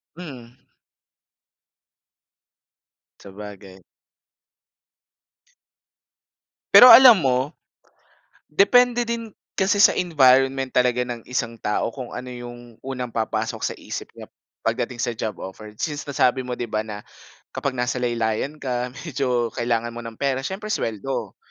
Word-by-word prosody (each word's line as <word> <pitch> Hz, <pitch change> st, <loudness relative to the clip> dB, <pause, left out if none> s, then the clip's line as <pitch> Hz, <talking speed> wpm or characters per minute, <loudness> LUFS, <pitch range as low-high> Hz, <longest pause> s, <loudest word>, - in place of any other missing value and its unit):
Mhm. 130 Hz, -8 st, -11 dB, 2.6 s
Sabagay. 100 Hz, -1 st, -11 dB, 2.9 s
Pero 240 Hz, +4 st, +11 dB
alam 245 Hz, -3 st, +10 dB
mo, 130 Hz, 0 st, 0 dB, 0.9 s
depende 240 Hz, +8 st, +4 dB
din 230 Hz, -1 st, -4 dB, 0.2 s
kasi 195 Hz, +1 st, +1 dB
sa -, -, +7 dB
environment 135 Hz, -5 st, +3 dB
talaga 125 Hz, 0 st, +2 dB
ng 120 Hz, -1 st, -8 dB
isang 115 Hz, -3 st, -3 dB
tao 105 Hz, +2 st, -1 dB
kung 130 Hz, -3 st, -7 dB
ano 125 Hz, +1 st, -7 dB
'yung 120 Hz, -1 st, -11 dB
unang 125 Hz, -3 st, -6 dB
papasok 110 Hz, -1 st, -2 dB
sa -, -, -2 dB
isip -, -, -7 dB
niya -, -, -11 dB, 0.3 s
pagdating 125 Hz, -, -2 dB
sa 120 Hz, -, -1 dB
job 110 Hz, -1 st, -4 dB
offer. 105 Hz, +3 st, -10 dB
Since 145 Hz, +2 st, -4 dB
nasabi 130 Hz, -2 st, +2 dB
mo 125 Hz, -1 st, -5 dB
'di -, -, -3 dB
ba 110 Hz, -, 0 dB
na 105 Hz, -1 st, -8 dB, 0.5 s
kapag 135 Hz, -2 st, -3 dB
nasa 125 Hz, +1 st, -1 dB
laylayan 120 Hz, +4 st, -1 dB
ka, 125 Hz, -3 st, -3 dB, 0.2 s
medyo 125 Hz, -6 st, -1 dB
kailangan 120 Hz, -1 st, -1 dB
mo 120 Hz, -, -7 dB
ng 115 Hz, -1 st, -9 dB
pera, 135 Hz, -1 st, -1 dB
siyempre 200 Hz, +8 st, -5 dB
suweldo. 115 Hz, +5 st, -3 dB
125 Hz, 120 wpm, -22 LUFS, 115-140 Hz, 2.9 s, Pero